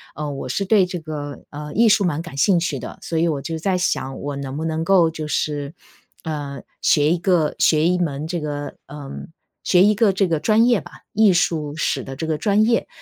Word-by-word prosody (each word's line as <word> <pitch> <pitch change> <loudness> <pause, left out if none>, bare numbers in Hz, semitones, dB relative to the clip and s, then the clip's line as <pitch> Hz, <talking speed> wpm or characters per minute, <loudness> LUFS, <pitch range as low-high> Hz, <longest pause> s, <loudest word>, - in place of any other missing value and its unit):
呃， 150 0 -4
我 135 -2 -6
是 165 +10 -1
对 195 -1 +4
这 180 0 -5
个， 150 -3 -7
呃， 150 0 -7
艺 230 +2 +4
术 210 -1 +4
蛮 165 -4 0
感 170 -4 -10
兴 175 +5 +4
趣 170 - -2
的。 - - -8
所 165 - -3
以 170 - +2
我 150 -4 -1
就 160 +4 -4
在 185 +3 0
想 135 -7 -1
我 145 0 -4
能 135 0 -5
不 160 - -3
能 160 0 -1
够 180 -3 +4
就 155 -1 -5
是， 145 -1 -2 0.5
呃， 145 -3 -5 0.2
学 150 0 +3
一 175 - +2
个 175 -3 +1
学 155 +1 +4
一 180 0 +2
门 150 -4 -2
这 175 +1 -2
个 145 -1 -5
呃， 145 -1 -9 0.5
学 180 0 +4
一 210 - +5
个 210 0 +3
这 195 0 +1
个 165 -3 0
专 220 +6 +3
业 240 -5 +3
吧， - - -13 0.2
艺 215 -1 +5
术 155 -4 0
史 140 -4 -1
的 135 - -7
这 160 - -4
个 160 -1 -1
专 205 +6 +2
业。 230 +1 +1
160 Hz, 245 characters per minute, -21 LUFS, 145-185 Hz, 0.5 s, 一